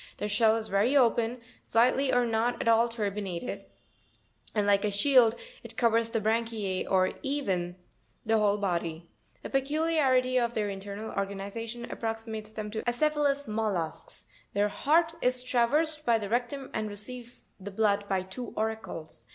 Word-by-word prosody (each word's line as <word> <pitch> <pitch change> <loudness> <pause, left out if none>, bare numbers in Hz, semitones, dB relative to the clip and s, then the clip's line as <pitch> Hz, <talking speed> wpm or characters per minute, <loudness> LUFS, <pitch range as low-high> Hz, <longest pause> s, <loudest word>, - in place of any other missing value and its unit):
Their 210 - -2
shell 220 +1 +4
is 225 -1 -2
very 210 +9 +3
open, 235 -1 +2 0.2
slightly 255 +4 +3
or 245 0 +3
not 230 +1 0
at - - -2
all 230 +1 +5
turbinated, 205 -2 -4 0.9
and, 210 -1 +2
like 200 -1 +3
a 210 - +2
shield, 235 +2 +5 0.3
it - - -12
covers 230 -1 +3
the 230 - 0
branchize 220 -3 -1
or 185 -1 +3
even 195 - -1 0.5
the 225 0 +3
whole 205 -1 +3
body. 170 -4 -2 0.3
A - - -5
peculiarity 270 -3 +2
of 235 -1 -1
their 210 -2 0
internal 200 +2 -6
organi 200 0 -3
zation 230 +1 -5
approximates 225 -1 -4
them 215 -1 -5
to 220 - -3
the - - -16
acephalous 285 +1 +1
mollusks; 210 -7 -2 0.3
their 205 +1 +2
heart 325 +10 +2
is 250 0 +1
traversed 295 +6 +2
by 235 -4 +3
the 205 -3 -5
rectum 245 +4 -2
and 215 -1 -2
receives 235 +4 -9
the 195 +1 -7
blood 205 0 +1
by 190 -1 +1
two 200 +6 -8
auricles. 190 - -4
225 Hz, 160 wpm, -29 LUFS, 205-250 Hz, 0.9 s, all